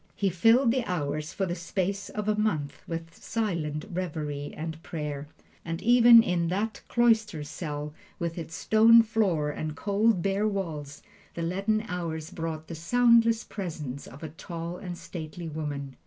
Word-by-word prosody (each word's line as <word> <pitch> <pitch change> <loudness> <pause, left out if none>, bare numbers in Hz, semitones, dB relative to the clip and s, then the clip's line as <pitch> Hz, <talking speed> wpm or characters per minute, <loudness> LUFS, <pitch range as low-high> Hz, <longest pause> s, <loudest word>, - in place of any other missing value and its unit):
He 195 -2 +1
filled 225 +8 +5
the 255 0 +1
hours 155 -4 -2
for 195 - -1
the 175 - -2
space 190 +3 -2
of 210 -1 -4
a 215 - +3
month 155 -10 -1
with 165 0 -5
silent 170 -9 -2
reverie 150 -5 -3
and 160 0 -5
prayer. 150 -4 -5 0.4
And 165 0 -4
even 235 -1 +8
in 175 -3 0
that 205 +4 -2
cloister 225 -9 +2
cell, 150 -1 -5 0.2
with 170 -1 -3
its 165 -1 -6
stone 225 +3 +6
floor 195 -10 +1
and 155 +1 -4
cold, 205 +2 +2
bare 195 +2 +1
walls, 155 -8 -4 0.3
the 170 - -3
leaden 200 +5 0
hours 165 -4 -4
brought 160 -1 -4
the - - -6
soundless 230 +6 +4
presence 155 -9 -6
of 140 +5 -12
a 160 - -4
tall 170 +2 -6
and 180 -2 -6
stately 165 0 -7
woman. 145 -3 -5
170 Hz, 155 wpm, -28 LUFS, 155-210 Hz, 0.4 s, even